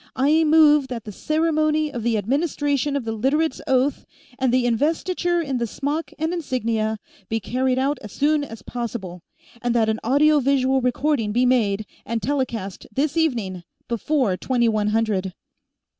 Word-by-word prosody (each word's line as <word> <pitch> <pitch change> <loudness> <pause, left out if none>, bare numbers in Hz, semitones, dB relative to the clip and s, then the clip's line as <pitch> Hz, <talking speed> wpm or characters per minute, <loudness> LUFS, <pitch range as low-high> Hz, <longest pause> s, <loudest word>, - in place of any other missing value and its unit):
I 295 +5 +3
move 300 -2 +5
that 240 -4 -5
the 210 - -7
ceremony 310 - 0
of 240 - -4
the 230 0 +1
administration 285 - 0
of 275 -4 -2
the 225 - -2
Literates' 270 +7 0
Oath, 265 +2 +1 0.4
and 260 -2 +2
the 250 0 +2
investiture 335 +7 0
in 270 -4 -2
the 235 - -1
smock 290 +8 -3
and 320 +3 -1
insignia, 230 -9 -1 0.3
be 225 - 0
carried 255 +4 0
out 270 +1 0
as 210 - -9
soon 295 +4 +1
as 225 -6 -9
possible, 215 -7 -5 0.4
and 240 -1 0
that 225 -2 +3
an 220 0 -1
audio 295 +5 +4
visual 265 -1 +2
recording 250 -2 0
be 245 +4 +2
made, 215 -5 +2 0.2
and 230 +2 -2
telecast 235 -8 -3
this 280 +3 -1
evening, 230 - 0 0.3
before 235 -2 0
twenty 240 +1 +1
one 215 -2 +1
hundred." 210 -4 0
255 Hz, 160 wpm, -22 LUFS, 225-295 Hz, 0.4 s, move